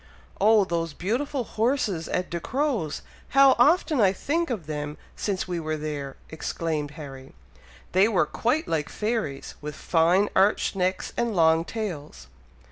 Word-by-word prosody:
"Oh! 215 Hz, -1 st, +5 dB
those 165 Hz, -3 st, -2 dB
beautiful 250 Hz, -, -2 dB
horses 220 Hz, -, 0 dB
at 180 Hz, -, -2 dB
Ducrow's! 225 Hz, -, -1 dB, 0.3 s
How 275 Hz, -1 st, +8 dB
often 305 Hz, 0 st, +4 dB
I 195 Hz, -2 st, +5 dB
think 330 Hz, -, -1 dB
of 215 Hz, -10 st, -3 dB
them 150 Hz, 0 st, -4 dB, 0.2 s
since 195 Hz, -3 st, -2 dB
we 175 Hz, -2 st, -2 dB
were 155 Hz, -1 st, -2 dB
there!" 145 Hz, -3 st, -5 dB
exclaimed 160 Hz, -1 st, -3 dB
Harry. 135 Hz, -3 st, -10 dB, 0.6 s
"They 190 Hz, +3 st, +5 dB
were 205 Hz, -8 st, +2 dB
quite 255 Hz, -, 0 dB
like 155 Hz, -2 st, -1 dB
fairies, 210 Hz, -11 st, -3 dB
with 150 Hz, 0 st, -6 dB
fine 175 Hz, +6 st, +3 dB
arched 195 Hz, +1 st, +3 dB
necks, 185 Hz, 0 st, -1 dB
and 235 Hz, -3 st, -1 dB
long 160 Hz, -1 st, +4 dB
tails!" 160 Hz, -, -5 dB
185 Hz, 140 wpm, -26 LUFS, 155-225 Hz, 0.6 s, How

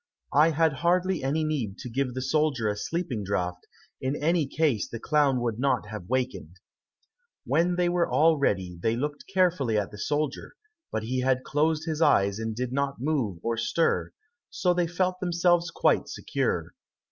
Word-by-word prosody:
I 150 Hz, +3 st, +6 dB
had 160 Hz, -1 st, +2 dB
hardly 180 Hz, -1 st, +1 dB
any 150 Hz, +4 st, 0 dB
need 130 Hz, -10 st, -2 dB
to 130 Hz, -, -7 dB
give 130 Hz, +1 st, -2 dB
the 130 Hz, -, -2 dB
soldier 150 Hz, -6 st, +1 dB
a 105 Hz, -, 0 dB
sleeping 130 Hz, -, -3 dB
draught, 90 Hz, -2 st, -3 dB, 0.3 s
in 130 Hz, +2 st, -1 dB
any 160 Hz, 0 st, +1 dB
case 145 Hz, -7 st, 0 dB
the 115 Hz, -, -6 dB
clown 145 Hz, -1 st, +2 dB
would 115 Hz, -2 st, -2 dB
not 135 Hz, -5 st, 0 dB
have 105 Hz, -4 st, -7 dB
awakened." 125 Hz, -7 st, -3 dB, 0.9 s
When 175 Hz, +1 st, +2 dB
they 180 Hz, 0 st, +2 dB
were 175 Hz, 0 st, +1 dB
all 160 Hz, -1 st, +4 dB
ready 95 Hz, -9 st, 0 dB
they 115 Hz, +3 st, +1 dB
looked 145 Hz, +4 st, -4 dB
carefully 175 Hz, -, +2 dB
at 105 Hz, -1 st, -1 dB
the 105 Hz, -, -10 dB
soldier, 150 Hz, +2 st, -2 dB, 0.4 s
but 110 Hz, -, -2 dB
he 130 Hz, +3 st, -2 dB
had 130 Hz, 0 st, +1 dB
closed 155 Hz, +2 st, 0 dB
his 160 Hz, -1 st, -3 dB
eyes 100 Hz, -8 st, +3 dB
and 110 Hz, -1 st, -3 dB
did 125 Hz, +1 st, -3 dB
not 140 Hz, -1 st, -1 dB
move 130 Hz, -, -1 dB
or 115 Hz, 0 st, -1 dB
stir, 120 Hz, +8 st, +1 dB, 0.4 s
so 180 Hz, -1 st, +1 dB
they 175 Hz, -1 st, +1 dB
felt 185 Hz, +1 st, -1 dB
themselves 175 Hz, -1 st, +2 dB
quite -, -, +2 dB
secure. -, -, -2 dB
140 Hz, 175 wpm, -27 LUFS, 115-165 Hz, 0.9 s, I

